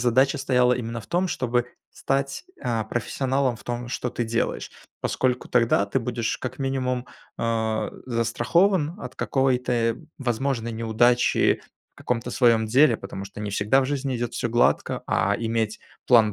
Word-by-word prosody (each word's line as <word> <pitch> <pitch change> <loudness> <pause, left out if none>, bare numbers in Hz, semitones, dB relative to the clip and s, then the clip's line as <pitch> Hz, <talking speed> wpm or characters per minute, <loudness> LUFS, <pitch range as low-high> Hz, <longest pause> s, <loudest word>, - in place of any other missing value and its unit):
задача 125 +3 +3
стояла 125 -1 +3
именно 115 -1 -3
в 100 - -14
том, 180 +2 +1
чтобы 120 -5 0 0.3
стать, 135 0 -2 0.2
а, 115 -4 -1
профессионалом 130 +3 -1
в - - -16
том, 120 0 -4
что 125 - -2
ты 120 - -2
делаешь. 115 0 -2 0.3
Поскольку 125 -1 0
тогда 115 -4 +3
ты 100 - 0
будешь 115 -2 -2
как 130 0 -5
минимум, 130 -2 -1 0.3
а, 110 -1 -1 0.2
застрахован 145 - +2
от - - -8
какой-то 125 -3 +1 0.2
возможной 120 -2 -1
неудачи 115 +2 +3 0.3
в - - -70
каком-то 120 0 -2
своём 115 -3 +3
деле, 125 +2 +5
потому 100 -1 -7
что 100 - -9
не 105 -1 -3
всегда 105 +6 +3
в 130 - 0
жизни 135 -2 -2
идёт 120 0 -3
всё - - -1
гладко, 120 +1 +2
а - - +2
иметь 115 -1 -1 0.3
план 115 -4 +5
120 Hz, 155 wpm, -25 LUFS, 115-130 Hz, 0.3 s, деле